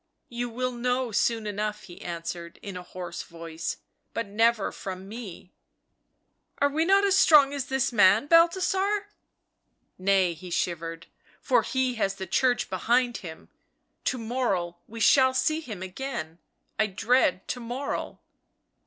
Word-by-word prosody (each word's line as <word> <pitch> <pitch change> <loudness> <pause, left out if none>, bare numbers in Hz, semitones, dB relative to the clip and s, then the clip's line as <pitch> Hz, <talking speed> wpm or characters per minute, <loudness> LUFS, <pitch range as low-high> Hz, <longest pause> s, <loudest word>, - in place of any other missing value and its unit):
"You 240 0 -3
will 255 +2 -2
know 250 0 -1
soon 225 +1 +1
enough," 210 0 -3
he 175 - -12
answered 170 0 -6
in 200 -2 -6
a 180 - -5
hoarse 180 -1 -7
voice. 165 -1 -6 0.2
" - - -49
But 230 - -1
never 220 +1 +2
from 190 0 -7
me." 205 -5 -9 0.5
" - - -49
Are 285 - +3
we 315 +3 0
not 395 +2 +4
as 390 -1 +3
strong 295 -7 +6
as 280 -2 -3
this 265 -1 0
man, 205 +1 +5
Balthasar 380 +5 +3 0.2
!" - - -52
" - - -47
Nay," 190 -2 +3
he 180 +2 -10
shivered, 165 -1 -3 0.2
" - - -30
for - - +3
he 260 -1 0
has 195 0 +1
the 190 - -5
Church 250 +4 +1
behind 240 +6 +1
him 160 -4 -10 0.3
— - - -48
to 255 - 0
morrow, 220 -8 -1
we 230 +1 -9
shall 260 +3 +5
see 310 +3 +1
him 215 - -7
again 185 -5 -5 0.2
— - - -45
I 215 - +3
dread 195 -2 +1
to 250 - -2
morrow." 245 +4 -4
230 Hz, 165 wpm, -27 LUFS, 185-260 Hz, 0.5 s, strong